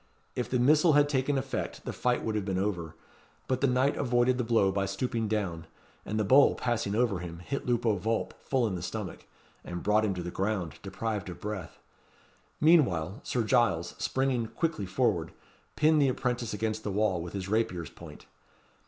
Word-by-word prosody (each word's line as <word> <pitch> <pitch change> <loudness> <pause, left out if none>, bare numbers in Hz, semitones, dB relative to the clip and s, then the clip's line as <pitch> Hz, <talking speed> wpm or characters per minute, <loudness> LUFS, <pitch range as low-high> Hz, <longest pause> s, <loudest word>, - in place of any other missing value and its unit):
If 125 - -2
the 130 - +1
missile 150 +6 +5
had 145 0 +5
taken 140 0 +1
effect, 130 - -4
the - - -4
fight 125 -1 0
would 110 - -1
have 105 -1 -1
been 95 -1 -2
over; 90 -5 -2 0.5
but 130 -1 0
the 140 - +4
knight 130 +2 +2
avoided 125 0 +2
the - - +1
blow 110 -4 +3
by 100 0 -1
stooping 120 -2 -2
down, 90 -6 -2 0.4
and 110 - -1
the - - +2
bowl, 135 +8 +6
passing 115 -4 -1
over 115 -5 +1
him, 85 -1 -7
hit 130 +12 -5
Lupo 120 -2 +2
Vulp 110 +4 -1
full 130 -3 +1
in 105 - -1
the 90 - -4
stomach, 100 +2 -6 0.4
and 85 0 -6
brought 105 +1 +3
him 100 -3 0
to 90 - -4
the 90 - -5
ground 95 -6 -2
deprived 100 0 -3
of 90 - -8
breath. 105 -4 -5 0.8
Meanwhile, 110 - +3
Sir 125 -8 -1
Giles, 110 -8 +2
springing 130 -3 0
quickly 155 - -2
forward, 95 -5 0 0.4
pinned 155 0 +4
the 140 - +4
apprentice 125 -3 -1
against 110 0 -2
the - - -2
wall 100 -3 +1
with 85 0 -7
his 95 -2 -4
rapier's 100 -6 -1
point. - - -12
110 Hz, 190 wpm, -29 LUFS, 95-125 Hz, 0.8 s, bowl